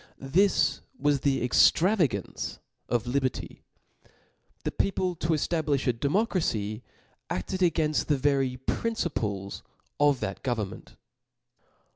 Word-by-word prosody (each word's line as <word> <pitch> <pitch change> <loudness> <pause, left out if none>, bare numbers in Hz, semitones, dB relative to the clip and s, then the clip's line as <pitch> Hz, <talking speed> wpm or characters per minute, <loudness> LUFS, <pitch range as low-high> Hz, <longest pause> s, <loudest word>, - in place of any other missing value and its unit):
This 185 +9 +2 0.2
was 145 - +2
the 135 -2 +1
ex<^ - - +6
travagance 165 - 0 0.3
of 120 -1 0
liberty. 130 0 -2 1.0
The - - -1
people, 185 -2 0
to 160 - -3
eftabli(h 155 -3 +1
a 125 - +3
democracy, 140 - 0 0.5
afted 95 - -3
againft 160 -4 +1
the 145 - +2
very 135 -2 +1
principles 105 - -2 0.4
of 145 -3 +4
that 95 - -3
government. 110 -6 -4
140 Hz, 105 wpm, -28 LUFS, 120-165 Hz, 1.0 s, ex<^